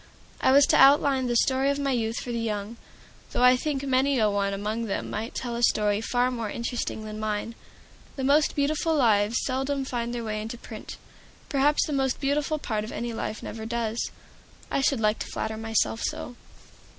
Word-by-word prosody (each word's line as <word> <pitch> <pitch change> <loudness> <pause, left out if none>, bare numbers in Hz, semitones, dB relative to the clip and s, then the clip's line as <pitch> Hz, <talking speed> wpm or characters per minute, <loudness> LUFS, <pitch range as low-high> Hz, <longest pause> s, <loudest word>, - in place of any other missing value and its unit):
I - - +4
was 280 +1 +7
to - - +3
outline 275 -1 +5
the 240 - 0
story 265 +3 +3
of 280 - 0
my 280 -1 0
youth 230 -2 -1
for 245 - -5
the 235 - -2
young, 215 0 -3 0.6
though - - +1
I 250 0 +7
think 280 +1 -2
many 270 0 +2
a 215 -3 +3
one 200 0 0
among 210 +3 -2
them 200 - -3
might 225 +3 -4
tell 240 -2 -3
a 235 - -3
story 210 -3 +2
far 245 +2 +1
more 230 -4 -3
interesting 235 -1 -3
than 215 0 -6
mine. 215 +1 -2 0.6
The 270 - -4
most 290 +3 +3
beautiful 305 +3 +1
lives 225 -4 +3
seldom 270 +1 -1
find 240 -2 -3
their 240 -1 -4
way 215 -1 -3
into 225 +2 -6
print. 220 -2 -9 0.5
Perhaps 290 +1 +3
the 300 - -4
most 265 -2 0
beautiful 295 +2 0
part 220 -7 -2
of 215 - -7
any 235 0 -4
life 220 -1 -4
never 220 0 -6
does. 230 -1 -2 0.6
I - - +1
should 270 -2 +2
like 215 0 +2
to - - -4
flatter 220 0 -3
myself 225 0 0
so. 245 - -4
240 Hz, 200 wpm, -26 LUFS, 220-270 Hz, 0.6 s, was